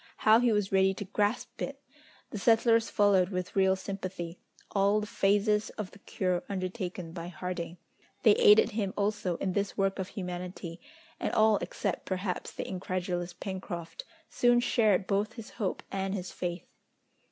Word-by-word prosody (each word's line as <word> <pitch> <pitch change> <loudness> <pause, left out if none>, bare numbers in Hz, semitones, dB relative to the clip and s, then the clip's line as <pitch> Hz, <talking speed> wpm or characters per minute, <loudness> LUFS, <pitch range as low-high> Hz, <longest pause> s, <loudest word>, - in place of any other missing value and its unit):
How 220 +1 +6
he 245 -1 +3
was 210 -2 +1
ready 190 0 +4
to 205 - -5
grasp 205 +3 -1
it! - - -4 0.5
The 210 - -4
settlers 230 +1 +4
followed 200 -3 +4
with 180 -2 -4
real 190 -1 +4
sympathy 185 -3 -5 0.3
all 200 +1 +3
the 210 - -3
phases 210 +1 +2
of 210 -3 -4
the 200 - -15
cure 185 -3 -1
undertaken 185 -3 -4
by 170 0 -6
Harding. 175 0 -5 0.5
They - - +8
aided 445 -1 +6
him 205 -3 -2
also 205 -4 0
in 185 - -2
this 200 0 -1
work 195 0 +1
of 190 - -2
humanity, 180 -2 -6 0.4
and - - -1
all, 215 -1 +5
except - - -3
perhaps 185 -1 -2
the - - -5
incredulous 180 -1 -3
Pencroft, 175 -4 -6 0.2
soon 245 0 +3
shared 215 -6 +3
both 205 +3 0
his 230 -2 -9
hope 205 -6 -3
and 195 0 -2
his 180 -2 -5
faith. 175 -1 -4
195 Hz, 160 wpm, -30 LUFS, 180-210 Hz, 0.5 s, They